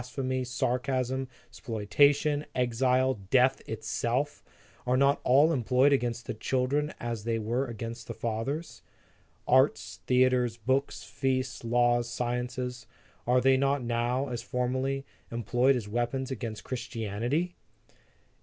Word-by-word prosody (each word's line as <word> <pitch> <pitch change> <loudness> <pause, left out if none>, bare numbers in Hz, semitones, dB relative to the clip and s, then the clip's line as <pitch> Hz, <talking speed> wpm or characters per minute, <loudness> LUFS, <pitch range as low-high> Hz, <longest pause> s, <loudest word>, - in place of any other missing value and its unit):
phemy, 130 +1 -2
sarcasm, 130 +1 -1 0.2
spoliation, 145 +7 +2
exile, 125 0 +2
death 130 +2 +4
itself, 115 +5 -2 0.4
are 125 +1 +3
not 140 +1 +3
all 145 +6 +5
employed 130 +2 +3
against 120 -2 -1
the - - -3
children, 135 +6 0
as 115 -3 -4
they 115 0 0
were 120 +5 -1
against 115 0 -6
the - - -4
fathers? 120 +8 -3 0.7
Arts, 130 +3 +2
theatres, 125 -2 +3
books, 130 +5 -1
feasts, 130 -2 -2
laws,, 120 0 +2
sciences, 125 +1 -3 0.4
are 125 +1 +4
they 130 0 +4
not 135 0 +1
now, 120 +3 0
as 120 -1 -4
formerly, 130 +2 -2 0.3
employed 120 +3 +2
as 115 -5 -3
weap 120 +4 -1
ons 130 0 -3
against 110 -4 -5
Christianity? 120 - -2
125 Hz, 120 wpm, -29 LUFS, 120-135 Hz, 0.7 s, all